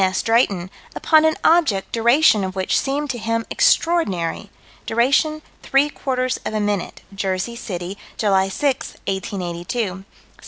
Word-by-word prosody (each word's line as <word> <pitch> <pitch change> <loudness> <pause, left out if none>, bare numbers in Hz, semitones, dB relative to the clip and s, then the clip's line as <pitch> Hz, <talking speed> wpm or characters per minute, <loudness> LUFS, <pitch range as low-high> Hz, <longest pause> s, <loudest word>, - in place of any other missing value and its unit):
S. 185 0 0
Drayton, 200 -6 +1 0.2
upon 315 -1 +4
an 315 - +2
object 305 - +3
duration 235 -1 +4
of 190 0 -4
which 190 -1 +1
seemed 280 +1 -2
to 240 - -6
him 230 +1 -1
extraordinary; 215 - +1 0.4
duration 280 +7 +1 0.2
three 275 +2 +2
quarters 255 -2 -2
of 215 - -4
a - - +1
minute, 205 -3 -2
Jersey 195 +3 -2
City, 190 -4 -6 0.2
July 195 -2 +2
6, 275 +5 -1
1882 185 +1 -4
(_Sci. 190 -3 -3
225 Hz, 140 wpm, -20 LUFS, 190-275 Hz, 0.4 s, upon